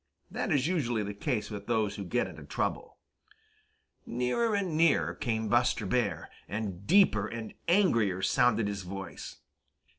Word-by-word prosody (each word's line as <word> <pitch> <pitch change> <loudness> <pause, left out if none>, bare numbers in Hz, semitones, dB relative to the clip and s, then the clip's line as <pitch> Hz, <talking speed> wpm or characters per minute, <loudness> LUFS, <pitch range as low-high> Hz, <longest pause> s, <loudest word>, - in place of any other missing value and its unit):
That - - -2
is 140 -2 +2
usually 125 - 0
the 100 0 -4
case 110 0 -2
with 100 -1 -7
those 110 -4 +1
who 100 - -5
get 120 +7 0
into - - -9
trouble. - - -3 1.1
Nearer 125 - 0
and 190 -6 -1
nearer 165 +1 +3
came 110 -2 -2
Buster 120 -1 +2
Bear, 100 -5 0 0.2
and 100 -2 -5
deeper 165 - +4
and 115 -1 -6
angrier 115 - +3
sounded 120 -4 +3
his 100 -1 -3
voice. 95 +1 -7
115 Hz, 145 wpm, -30 LUFS, 100-135 Hz, 1.1 s, deeper